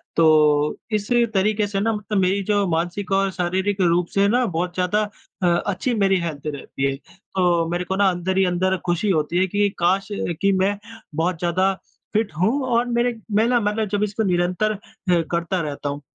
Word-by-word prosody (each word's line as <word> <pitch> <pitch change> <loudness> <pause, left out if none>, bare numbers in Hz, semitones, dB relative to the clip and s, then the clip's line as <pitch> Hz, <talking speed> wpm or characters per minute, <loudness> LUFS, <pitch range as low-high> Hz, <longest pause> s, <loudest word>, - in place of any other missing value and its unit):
तो 150 -2 +4
इस 210 0 -1 0.2
तरीके 210 +2 +1
से 200 -1 -2
ना 225 +3 +1
मतलब 210 0 -3
मेरी 190 +2 +1
जो 205 0 +1
मानसिक 175 +4 -2
और 195 0 +2
शारीरिक 190 +3 -1
रूप 175 0 +2
से 195 - +2
है 200 - +5
ना 245 +4 +2
बहुत 175 -2 -2
ज़्यादा 185 +4 +1 0.4
अ, 180 - +4
अच्छी 185 +7 0
मेरी 195 -4 +2
हेल्थ 155 -4 -4
रहती 135 -1 -2
है। - - -4 0.4
तो 175 -2 +2
मेरे 175 +1 -1
को 190 - -2
ना 195 0 +4
अंदर 185 +1 -2
ही 195 - +4
अंदर 185 +1 +1
खुशी 175 +4 0
होती 165 0 +1
है 190 +1 +3
कि 205 +2 +1
काश! 185 +3 +2
कि 195 0 0
मैं 195 +1 +1 0.4
बहुत 165 +2 0
ज़्यादा 185 +3 +1 0.4
फिट 215 -2 +1
होऊँ 230 +10 +2
और 235 +1 +3
मेरे 240 0 +1 0.2
मैं 220 - +4
ना 245 -1 +3
मतलब 210 0 -1
जब 205 +1 0
इसको 210 +1 -1
निरंतर 180 +3 +1 0.4
हुँ 175 -2 +4
करता 170 +2 -1
रहता 145 -1 -4
हूँ। 145 +1 -5
190 Hz, 195 wpm, -22 LUFS, 175-205 Hz, 0.4 s, है